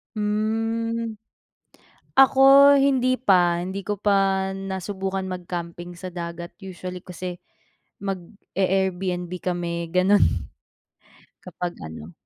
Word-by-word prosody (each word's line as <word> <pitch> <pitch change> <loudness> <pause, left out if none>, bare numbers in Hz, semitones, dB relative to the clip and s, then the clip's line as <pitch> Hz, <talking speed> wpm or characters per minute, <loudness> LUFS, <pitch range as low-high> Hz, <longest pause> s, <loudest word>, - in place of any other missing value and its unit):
Hmm, 225 +2 -1 1.0
ako 265 0 +6 0.4
hindi 255 -2 +3
pa, 180 -7 +3
hindi 190 +3 -4
ko 205 0 -3
pa 195 -1 +2
nasubukan 190 0 -4
mag-camping 175 -1 -6
sa 185 - -6
dagat 170 0 -6
usually 180 -1 -7
kasi 180 0 -6 0.7
mag-e-Airbnb 190 -1 -2
kami 170 -1 -3
ganun, 185 +3 +4 1.2
kapag 180 -1 -5
ano 80 +1 -9
190 Hz, 90 wpm, -24 LUFS, 175-205 Hz, 1.2 s, ako